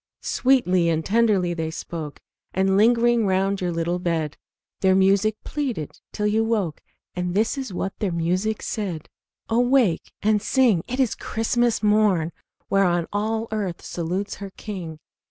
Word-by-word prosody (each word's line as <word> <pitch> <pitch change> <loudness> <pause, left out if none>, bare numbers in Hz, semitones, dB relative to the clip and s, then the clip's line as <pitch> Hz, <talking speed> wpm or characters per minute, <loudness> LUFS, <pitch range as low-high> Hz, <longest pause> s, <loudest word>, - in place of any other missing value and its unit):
Sweetly 185 -10 +2
and 160 -1 0
tenderly 205 -5 +2
they 160 -2 -3
spoke, 160 -2 -6 0.4
And 190 +1 +2
lingering 235 +1 +4
round 195 +1 +1
your 180 -1 0
little 170 +1 -1
bed, 165 -4 -1 0.4
Their 190 -1 +4
music 195 +3 +3
pleaded 255 - -4
till 210 - -2
you 215 +2 +2
woke, 210 -9 -1 0.3
And 180 0 -3
this 215 +2 +2
is 265 -6 -5
what 190 +1 -3
their 205 -4 0
music 180 +6 -1
said: 185 -8 -4 0.4
"Awake 240 -5 +2
and 210 0 +3
sing! 225 -7 +3
'tis 255 -2 +1
Christmas 230 0 0
morn, 210 -6 +3 0.4
Whereon 175 -4 +2
all 220 +2 -1
earth 200 -5 -3
salutes 180 +4 -3
her 200 -1 -7
King! 180 -7 -6
195 Hz, 140 wpm, -23 LUFS, 175-220 Hz, 0.4 s, lingering